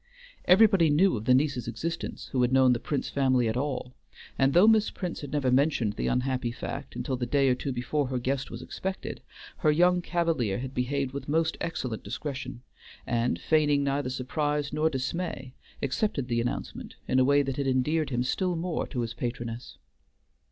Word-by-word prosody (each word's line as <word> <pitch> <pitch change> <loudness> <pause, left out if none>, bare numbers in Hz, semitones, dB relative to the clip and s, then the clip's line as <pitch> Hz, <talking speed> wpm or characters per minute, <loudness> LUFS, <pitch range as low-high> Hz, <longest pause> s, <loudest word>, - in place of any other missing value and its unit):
Everybody 190 -4 +6
knew 175 +5 +4
of 110 -1 -5
the 125 - +5
niece's 135 -4 0
existence 165 +8 -4
who 130 - +1
had 125 0 +2
known 130 -1 +5
the 120 - -1
Prince 145 +3 -2
family 130 -3 +2
at 110 - -1
all, 130 -1 -3 0.4
and 135 +1 +3
though 175 +8 +6
Miss 220 -1 +5
Prince 180 -3 -5
had 145 - -7
never 140 -4 +1
mentioned 130 -5 +2
the - - -2
unhappy 125 -1 0
fact - - -6
until 130 - -2
the 125 -1 -3
day 135 +1 +3
or - - +4
two 130 +2 -3
before 130 +3 -1
her 130 0 -2
guest 130 +2 -2
was - - -7
expected, 190 0 -5 0.4
her 155 - +2
young 180 +3 +4
cavalier 165 - 0
had 130 +1 -5
behaved 135 +1 -1
with 140 0 -6
most 160 +1 +1
excellent 125 -9 -3
discretion, 135 -4 -6 0.4
and 120 +1 0
feigning 150 -2 +2
neither 140 -1 -1
surprise 145 +3 -2
nor 155 +1 +2
dismay, 135 -1 -4 0.3
accepted 140 - -1
the 120 -1 +1
announcement 120 - -5
in 130 - +2
a - - +5
way 140 +2 +4
that 135 -1 -3
had 140 -1 -1
endeared 145 +4 +1
him 125 -2 0
still 180 +7 0
more 170 0 -2
to 125 - -3
his 115 -1 -3
patroness. 120 0 -5
135 Hz, 185 wpm, -28 LUFS, 125-155 Hz, 0.4 s, Everybody